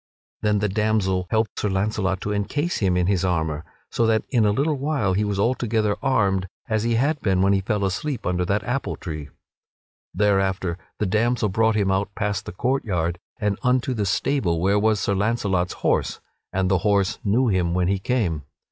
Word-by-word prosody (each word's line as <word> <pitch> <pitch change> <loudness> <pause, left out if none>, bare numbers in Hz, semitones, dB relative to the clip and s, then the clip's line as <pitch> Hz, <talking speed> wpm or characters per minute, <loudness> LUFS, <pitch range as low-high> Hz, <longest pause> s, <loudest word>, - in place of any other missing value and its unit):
Then 105 -1 +2
the 105 +1 +1
damsel 100 -3 0
helped 110 0 0
Sir 105 - 0
Launcelot 95 -1 0
to 105 - -2
encase 145 - -1
him 95 -3 +2
in 90 - +2
his 95 -1 +1
armor, 80 -4 -1 0.3
so 115 - +1
that 110 -1 +2
in 115 -4 +3
a - - +3
little 145 +8 +1
while 135 -9 0
he 100 +3 +1
was 105 -1 -1
altogether 110 -2 +1
armed 100 -8 +1 0.2
as 110 -3 0
he 115 +1 +1
had 140 +5 +1
been 95 -2 +2
when 100 +1 +4
he 95 - +2
fell 100 0 -1
asleep 120 +7 -3
under 90 0 0
that 100 +3 0
apple 125 +2 -2
tree. 75 -5 -6 0.8
Thereafter 95 -3 +1 0.2
the 105 - 0
damsel 110 +2 +1
brought 110 +3 +2
him 100 -2 +2
out 95 +1 0
past 105 -2 -2
the - - -4
court 130 +9 0
yard 85 -4 -1 0.2
and 105 -3 -1
unto 125 +1 +1
the 105 -4 -1
stable 100 - +1
where 100 +4 +2
was 110 0 +2
Sir 100 - 0
Launcelot's 100 -3 0
horse, - - +1 0.3
and 95 0 0
the 95 - +3
horse 100 0 +1
knew 115 +4 +2
him 90 -3 +1
when 90 -1 +1
he 95 0 +1
came. 95 -9 0
100 Hz, 195 wpm, -23 LUFS, 95-110 Hz, 0.8 s, when